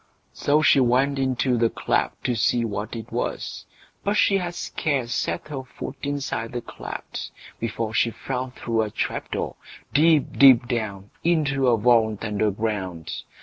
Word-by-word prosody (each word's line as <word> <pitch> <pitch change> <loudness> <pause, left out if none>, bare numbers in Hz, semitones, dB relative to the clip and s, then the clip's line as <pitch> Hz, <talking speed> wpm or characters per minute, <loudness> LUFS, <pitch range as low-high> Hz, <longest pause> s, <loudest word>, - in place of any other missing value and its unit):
So 150 +2 +2
she 140 - +6
went 130 +3 +3
into 130 -2 +1
the 115 0 +3
cleft - - -1
to 125 - +1
see 115 +1 +2
what 105 +1 -4
it 115 -2 -7
was, - - -3 0.4
but 205 +1 +1
she 195 -2 +4
had 175 -1 -4
scarce 135 -10 -1
set - - -2
her 140 -3 -4
foot 130 +1 -8
inside 140 -5 -3
the 120 - -2
cleft, - - -7 0.3
before 115 -1 -3
she 115 - +3
fell 130 +2 -4
through 115 -2 -1
a 110 - -1
trap - - -3
door, - - -3 0.4
deep, 155 0 +3
deep 130 -3 +8
down, 105 -5 -3
into 145 -6 +2
a 120 -2 +4
vault 110 -1 +3
under 105 0 +1
ground. 95 -5 -3
120 Hz, 160 wpm, -24 LUFS, 110-140 Hz, 0.4 s, deep